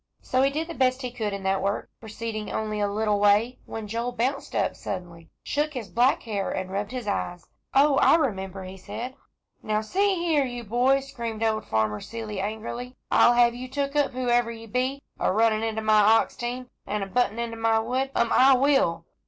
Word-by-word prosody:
So 255 - +1
he 270 - +4
did 310 +4 -3
the 335 - -6
best 260 -2 +1
he 250 - -3
could 220 -4 -3
in 200 -1 -5
that 190 0 +1
work, 200 +1 -1
proceeding 220 -1 -5
only 215 -1 -2
a 205 - +1
little 210 0 +1
way, 205 +4 +3
when 220 -1 -6
Joel 230 +3 -2
bounced 260 +4 -2
up - - +1
suddenly, 170 -4 -7
shook 300 0 -1
his 225 -6 -5
black 245 +7 +3
hair, 205 -4 -2
and 185 0 -4
rubbed 200 +1 -2
his 250 -4 -5
eyes. 180 -3 -3 0.3
"Oh, 280 0 +5
I - - +6
remember," 195 - -2
he 185 +1 -9
said. 240 +7 -6 0.5
"Now, 215 0 0
see 390 - +1
here 335 -5 +2
you 245 -2 -5
boy," 250 +5 +2
screamed 235 -5 -5
old 220 -1 0
Farmer 110 -1 0
Seeley, 220 -2 -6
angrily, 230 +5 -5 0.2
"I'll 240 - +6
have 240 0 +4
you 250 +2 -7
took 280 +1 -2
up, 290 -2 +2
whoever 240 -2 +1
ye 225 0 -9
be, 255 +5 -2 0.2
a - - +2
runnin' 220 +2 +3
into 220 -1 -2
my 215 0 +5
ox 220 +2 +4
team, 245 +1 -5 0.2
an' 210 -1 -1
a - - -2
buntin' 230 +2 0
into 235 -1 -3
my 225 0 +2
wood. 250 +4 -1
Um 235 - +2
I 265 +1 +6
will!" 270 -10 +2
230 Hz, 205 wpm, -26 LUFS, 210-255 Hz, 0.5 s, I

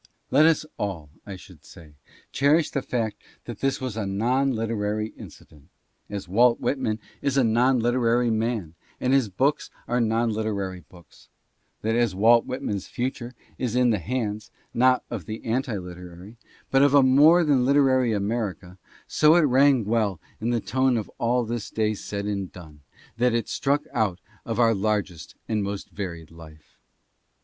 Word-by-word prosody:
Let 150 +4 +6
us 160 -1 +2
all, 85 -8 -4 0.2
I 100 - -6
should 90 - -15
say, 80 -3 -15 0.4
cherish 150 +4 +2
the 140 - -1
fact 115 -4 -3 0.2
that - - -8
this 135 0 0
was 130 -4 -4
a 110 -3 -3
non 125 +8 +1
literary 110 -2 -2
inci - - -13
dent, 75 -2 -21 0.4
as 100 -2 -6
Walt 115 +6 +3
Whitman 130 -6 -1 0.2
is 140 -1 0
a 135 - +4
non 120 +3 +3
literary 120 0 +1
man 110 -7 -2 0.3
and 130 +1 +1
his 135 -6 +3
books 135 +10 0 0.2
are 120 +1 +1
non 115 +1 +1
literary 100 -4 -3
books; 85 -5 -19 0.5
that 110 +1 0
as 120 -5 +1
Walt 115 +4 +4
Whitman's 120 -7 -4
future 125 0 -4 0.2
is 125 -2 -2
in 125 -1 +3
the 105 - 0
hands, 110 +1 -3 0.2
not 125 +1 +3
of 110 -7 -6
an 110 - -4
anti 120 -1 -1
literary, 90 +2 -10 0.4
but 135 - +4
of 145 0 +4
a 140 - +7
more 150 +7 +6
than 140 -5 +2
literary 130 -2 +3
America, 100 -4 -3 0.3
so 155 +1 +4
it 175 - +5
rang 135 -4 +4
well 105 -5 0 0.2
in 115 - -2
the 120 -1 +1
tone 130 +2 +1
of 110 - -5
all 120 +1 +1
this 115 -1 -4
day 110 -1 0
said 100 0 -5
and 100 -3 -3
done 80 -5 -13 0.4
that 120 0 +2
it 115 -2 -1
struck 145 +2 0
out 100 -5 0 0.3
of 115 +1 -3
our 115 -1 +4
largest 100 -5 -2
and 110 -2 -1
most 100 0 -5
varied 85 -6 -7
life. 80 -2 -16
115 Hz, 170 wpm, -25 LUFS, 100-130 Hz, 0.5 s, a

